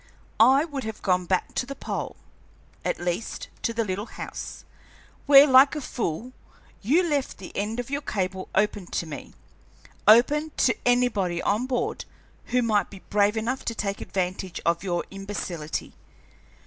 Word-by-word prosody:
I 265 +6 +6
would 285 -5 -5
have 220 -1 -6
gone 180 -2 +1
back 185 0 0
to 250 - -2
the 275 - -6
pole, - - -4 0.7
at - - -1
least 175 +5 -3
to - - 0
the 230 0 0
little 200 +3 -3
house, - - -7 0.6
where, 280 0 +10
like 270 +1 +6
a - - -2
fool, 235 - -3 0.5
you 320 - +3
left 290 -4 -1
the 190 - -11
end 215 +4 -2
of 245 +2 -5
your 285 +1 -1
cable 190 -6 -3
open 210 -3 +1
to 170 - -2
me, 155 -3 -9 0.7
open 290 +8 +5
to 235 - +3
anybody 220 -8 +2
on 215 +5 +1
board 245 -2 -2 0.4
who 250 0 +1
might 215 -3 +1
be 195 -2 -12
brave 205 +1 +3
enough 240 +4 -2
to 230 - -2
take 200 -2 -3
advantage 185 -1 -3
of 170 0 +2
your 175 -3 -1
imbecility. 195 -5 -5
215 Hz, 160 wpm, -26 LUFS, 190-255 Hz, 0.7 s, where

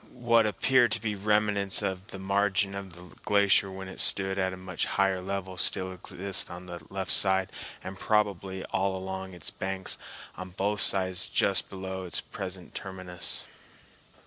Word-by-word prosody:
What 115 -2 +4
appear 120 +4 +4
to 115 - -1
be 105 -1 -2
remnants 105 -1 +2
of 95 0 -3
the - - -8
margin 100 0 +2
of 100 -2 -6
the 90 0 -13
glacier 100 -1 +4
when 95 0 -7
it 95 - -9
stood 95 0 +2
at 95 0 +1
a 95 - -7
much 90 -1 -3
higher 95 -1 +2
level 95 -1 -4
still 95 +1 0
exist 95 +1 -2
on 90 +1 -8
the 85 -3 -8
left 95 -1 -1
side 95 -1 +4 0.3
and 95 0 -7
probably 95 -3 0
all 95 0 +1
along 95 0 -5
its 85 - -3
banks 95 0 -1 0.4
on 95 -1 -8
both 100 +1 +1
sides 95 -1 +3
just - - +2
below 95 -1 -5
its 90 - -1
present 95 -1 -6
terminus. 90 -2 -2
95 Hz, 165 wpm, -29 LUFS, 95-100 Hz, 0.4 s, What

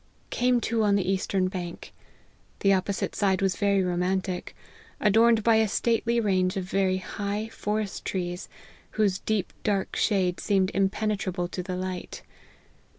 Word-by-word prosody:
Came 245 0 +2
to 230 -1 0
on 205 -2 +3
the 195 -3 0
eastern 190 0 +1
bank. 180 -2 -6 0.7
The 195 0 +5
opposite 190 +1 -1
side 190 -2 +2
was 195 -2 +1
very 200 -2 +2
romantic; 180 +1 -1 0.4
adorned 225 +3 +5
with 215 - -9
a 220 -1 +5
stately 235 +2 +1
range 185 -4 +1
of 190 - -1
very 190 0 +1
high 205 +3 -4
forest 210 -2 -3
trees, 180 -1 -3 0.5
whose 200 -3 +2
deep 215 -4 -1
dark 200 -2 0
shade 185 -4 +1
seemed 195 -2 +1
impenetrable 195 -2 0
to 180 - -4
the 180 0 -4
light. 185 0 -5
195 Hz, 145 wpm, -27 LUFS, 185-210 Hz, 0.7 s, The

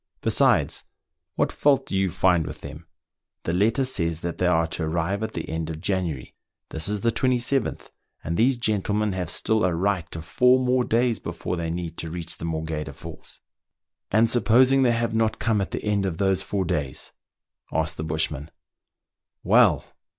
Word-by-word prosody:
Besides, - - +2 0.5
what - - +1
fault 140 -3 +2
do - - -4
you 95 0 +2
find 90 -1 +2
with 75 0 -8
them? 75 +3 -10 0.6
The 85 - -2
letter 110 +9 +2
says 85 -10 -1
they 85 +1 -1
are 85 -2 +3
to 80 +1 -4
arrive 85 +5 -1
at 110 0 -3
the 85 - -5
end 80 0 -3
of 80 -1 -5
January; 85 -8 -2 0.4
this 80 +2 -1
is 105 -1 -1
the 115 - +2
a7th, 130 +1 0 0.3
and 85 - -2
these 125 +6 +3
gentlemen 105 -2 0
have 90 -3 -3
still 110 +4 +1
a 90 -2 +2
right 90 -1 0
to 80 - -7
four 125 +9 +4
more 125 0 +2
days 120 -1 +1
before - - -4
they 85 -1 -3
need 85 -1 -4
to 80 - -4
reach 85 0 -6
the 85 - -5
Morgheda 80 -1 -3
Falls." - - -10 0.3
" - - -61
And 110 +3 +4
supposing 125 +3 +4
they 125 -2 +4
have 115 -1 -1
not 110 -1 +1
come 110 -2 +1
at 95 - -2
the - - -5
end 100 -2 +1
of 85 -3 -4
those 95 -1 +1
four 95 -1 -2
days 75 -6 -3 0.2
.<* - - -66
" - - -40
asked 80 -1 -1
the 80 - -3
bushman. 75 -1 -1 0.5
" - - -64
Well - - +4
95 Hz, 190 wpm, -24 LUFS, 80-115 Hz, 0.6 s, four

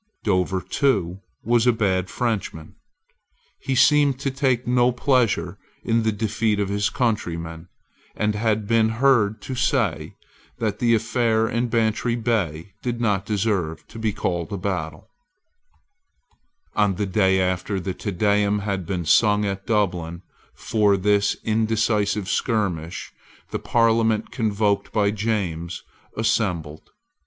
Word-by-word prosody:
Dover, 95 -2 +1
too, 95 - 0 0.2
was 120 +2 +2
a - - +7
bad 95 -5 0
Frenchman. 105 -9 -3 0.9
He 135 -1 -2
seemed 145 0 +4
to 135 - -1
take 130 -3 0
no 125 0 +3
pleasure 115 -9 +1 0.2
in 115 0 +1
the 110 0 +1
defeat 110 0 -1
of 100 -1 -1
his 100 0 0
countrymen, 85 -8 -2 0.5
and 105 0 0
had 105 -1 0
been 115 0 +3
heard 110 -3 +2
to 130 - -5
say 125 - 0 0.4
that 105 -2 -2
the 115 -1 +3
affair 115 0 +1
in 120 +1 -1
Bantry 115 0 0
Bay 100 -8 -2
did 120 -1 -3
not 105 -5 0
deserve 95 -7 -1
to 115 - -10
be 110 -1 0
called 85 -1 -3
a 100 - -3
battle, 90 -5 -4 1.7
On 105 -2 +2
the 105 - -1
day 95 -1 +2
after 95 +2 -1
the 95 +1 -4
Te 95 - -5
Deum 100 +2 +2
had 100 -4 -3
been 90 -3 -2
sung 105 +4 +4
at 95 -1 -4
Dublin 90 -5 -1 0.3
for 105 -3 +2
this 100 +1 +2
indecisive 110 -2 0
skirmish, 95 -8 -2 0.4
the - - -2
Parliament 115 -2 +2
convoked 105 -3 0
by 100 -2 +2
James 95 -6 -3 0.3
assembled. 90 -9 -1
105 Hz, 130 wpm, -23 LUFS, 95-115 Hz, 1.7 s, a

